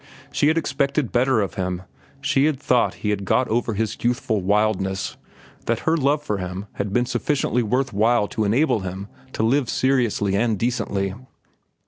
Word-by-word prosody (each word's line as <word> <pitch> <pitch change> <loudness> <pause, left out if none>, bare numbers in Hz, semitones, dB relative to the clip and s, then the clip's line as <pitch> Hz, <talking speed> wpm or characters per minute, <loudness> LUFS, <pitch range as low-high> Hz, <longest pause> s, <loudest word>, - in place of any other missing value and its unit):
She 145 - +2
had 160 +2 +3
expected 140 -3 0
better 125 -1 +3
of 100 - -2
him. 90 -1 -3 0.4
She 140 0 +2
had 150 -4 +1
thought 125 -3 +2
he 105 - +2
had 100 -1 -2
got 125 +6 +2
over 115 -1 0
his 110 +1 -1
youthful 120 -3 0
wildness, 95 -1 0 0.5
that 115 0 0
her 160 - +2
love 145 -1 +1
for 105 -8 -2
him 90 +2 -5
had 100 -1 -3
been 120 +4 +2
sufficiently 125 0 0
worth 125 +4 0
while 110 +1 +3
to 110 - -1
enable 115 +5 +2
him 95 +2 -6 0.2
to - - -1
live 130 +2 +2
seriously 120 -7 +1
and 110 +1 +1
decently. 100 -4 -1
115 Hz, 170 wpm, -22 LUFS, 100-130 Hz, 0.5 s, had